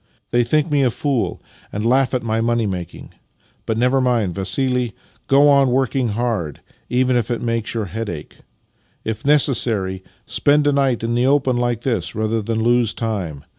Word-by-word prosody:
Tliey 120 - +4
tkink 155 +2 +1
me 145 -1 +3
a 130 - +3
fool, 135 0 -2 0.3
and 105 +2 -3
laugh 130 +2 +2
at 125 - -1
my 110 0 0
money 120 0 +1
making: 90 -4 -6 0.5
but 110 - -1
never 125 +3 +2
mind, 120 -8 +1
Vassili 125 +5 -1 0.2
— - - -34
go 140 +2 +5
on 140 -2 +5
working 130 0 +1
hard, 110 - -2 0.3
even 125 +1 +2
if 120 -1 0
it 120 - -1
makes 115 -2 -2
3'our 110 -5 -3
head 110 +3 -4
ache. 80 -4 -8 0.7
If 110 -1 -4
necessary, 110 -10 +2 0.2
spend 145 +1 +2
a 145 - +4
night 135 -4 +1
in 115 +1 -1
the 120 +2 +2
open 135 -3 +2
hke 120 -2 -1
this 110 -10 -2
rather 110 +1 0
than 110 +1 -2
lose 120 -2 +2
time. 95 - -4
120 Hz, 180 wpm, -20 LUFS, 110-130 Hz, 0.7 s, go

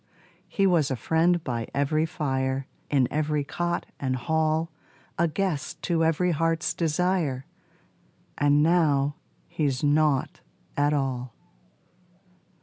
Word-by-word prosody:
He 195 - +1
was 170 -7 +3
a 130 - -1
friend 165 +5 +2
by 120 -3 -3
every 155 +3 +1
fire, 135 -4 -1 0.2
In 135 -4 +3
every 150 -1 0
cot 175 +4 -2
and 130 -2 -1
hall 160 +4 0 0.5
A 170 - +4
guest 170 -2 -2
to 165 -2 +1
every 165 +3 +2
heart's 165 +1 0
desire, 165 -5 0 0.9
And 145 +1 +3
now 150 -4 +2 0.3
he's 140 -4 -1
nought 145 -2 +2 0.4
at 145 +1 +2
all. 130 -4 -2
150 Hz, 115 wpm, -26 LUFS, 140-165 Hz, 0.9 s, A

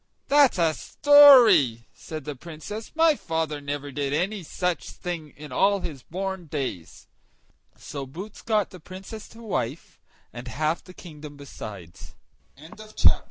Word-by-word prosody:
"That's 285 -5 +5
a 165 -2 +2
story!" 245 - +6
said 155 -3 -8
the 150 -1 -5
Princess, 170 - -8
"my 325 0 +5
father 160 - -3
never 145 0 -5
did 140 +1 -2
any 190 +6 -1
such 180 +1 -3
thing 170 -4 -6
in 150 -2 -10
all 195 +8 +2
his 145 -7 -6
born 190 +3 -5
days!" 135 - -5 0.7
So 140 -2 -7
Boots 190 +10 -9
got 215 -3 0
the 185 - -11
Princess 190 +6 -10
to 230 +1 -14
wife, 130 - -4 0.3
and 120 +2 -8
half 155 +5 -1
the 185 - -14
kingdom 150 -4 -11
besides. 100 - -10
160 Hz, 135 wpm, -25 LUFS, 145-195 Hz, 0.7 s, story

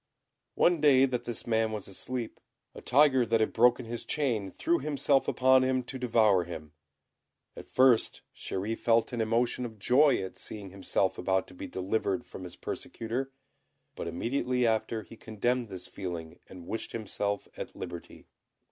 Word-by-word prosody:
One 175 -3 +3
day 135 -3 +6
that 125 -2 -3
this 120 - -5
man 110 -1 +1
was 105 -3 -5
asleep, 120 +4 -5 0.3
a - - -10
tiger 130 -1 +4
that 115 0 +2
had 110 - +1
broken 120 +1 +4
his 115 +1 -5
chain 120 -10 -1
threw 335 - 0
himself 140 -2 +1
upon 130 0 +4
him 130 0 +1
to 130 +2 -7
devour 110 -6 +3
him; 80 -3 -8 0.8
at - - -11
first 130 -3 +3
Chéri 100 +4 -3
felt 115 +1 +2
an 120 - -1
emotion 120 +3 +1
of 115 -3 -6
joy 135 +8 +4
at 95 - -7
seeing 100 -3 -7
himself 95 0 -1
about 95 -1 +1
to - - -13
be 90 - -7
delivered 100 +3 -1
from 95 - -9
his 90 - -8
persecutor, 125 +4 -4 0.6
but - - -5
immediately 125 +5 0
after 110 0 0
he 115 - -13
condemned 115 +2 -2
this 90 -2 -7
feeling 85 -3 -6
and 90 -2 -11
wished 110 - -4
himself 100 -2 -2
at - - -7
liberty. 85 -1 -8
115 Hz, 165 wpm, -29 LUFS, 95-125 Hz, 0.8 s, day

